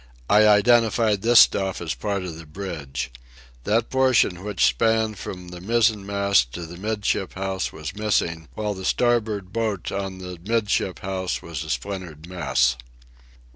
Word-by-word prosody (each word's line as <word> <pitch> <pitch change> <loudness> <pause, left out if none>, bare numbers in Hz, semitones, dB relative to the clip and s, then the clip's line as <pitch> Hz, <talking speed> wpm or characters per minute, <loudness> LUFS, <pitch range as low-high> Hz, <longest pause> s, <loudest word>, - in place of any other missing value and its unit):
I 105 +1 +6
identified 110 -1 +4
this 120 +2 +7
stuff 95 -1 +2
as 85 -2 -3
part 100 -3 -3
of 90 -3 -6
the 80 -1 -11
bridge. 75 -7 -5 0.5
That 115 +2 +1
portion 130 -9 +3
which 105 -2 +1
spanned 110 -3 +1
from 90 -1 -7
the 90 0 -9
mizzen 110 0 +2
mast 100 -11 +2
to 85 - -5
the 85 +2 -10
'midship 105 -1 -2
house 95 0 -3
was 80 +5 -7
missing, 85 -6 -1
while 105 -1 -2
the 95 -1 -8
starboard 110 -4 0
boat 110 -5 -2
on 95 -1 -4
the 90 -2 -8
'midship 100 -6 0
house 95 -1 -3
was 85 -1 -5
a 80 - -9
splintered 85 -4 -5
mess. 65 -8 +1
95 Hz, 155 wpm, -23 LUFS, 90-110 Hz, 0.5 s, this